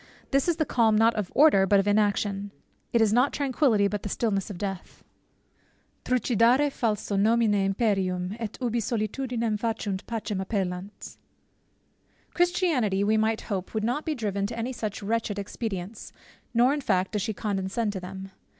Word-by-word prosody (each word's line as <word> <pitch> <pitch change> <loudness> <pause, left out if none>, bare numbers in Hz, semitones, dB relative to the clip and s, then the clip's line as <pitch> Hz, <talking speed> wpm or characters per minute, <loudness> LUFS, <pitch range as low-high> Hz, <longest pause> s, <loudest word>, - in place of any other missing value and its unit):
This 275 +3 +2
is 345 - +2
the 310 - 0
calm, 225 -5 +3
not 225 +2 +4
of 210 -4 -3
order, 275 -11 +6
but 200 +1 +5
of 195 - 0
inaction; 205 -1 +1 0.4
it 235 - +3
is 215 -1 +3
not 250 +4 +3
tranquillity, 260 -7 +2
but 205 0 -3
the 205 - -5
stillness 200 -2 -1
of 200 - -6
death; 195 -1 -6 1.0
Trucidare 250 +3 +3
falso 215 -5 -1
nomine 225 +1 +3
imperium, 195 -2 0
& 210 - -8
ubi 240 -1 0
solitudinem 230 0 -2
faciunt, 220 -4 -2
pacem 215 -4 -3
appellant 190 -1 -4 1.2
Christianity, 330 - +1
we 215 +2 +2
might 220 0 +1
hope, 195 -1 -5
would 215 - 0
not 245 +7 -1
be 315 - -2
driven 200 -4 -2
to 230 +2 -7
any 240 +3 -3
such 215 -3 -5
wretched 220 -1 -1
expedients; 200 -1 -5 0.4
nor 245 +3 +4
in 295 - -2
fact 190 -7 0
does 210 - -1
she 220 - -1
condescend 205 +1 -2
to 190 - -4
them. 190 +1 -8
215 Hz, 160 wpm, -26 LUFS, 200-235 Hz, 1.2 s, order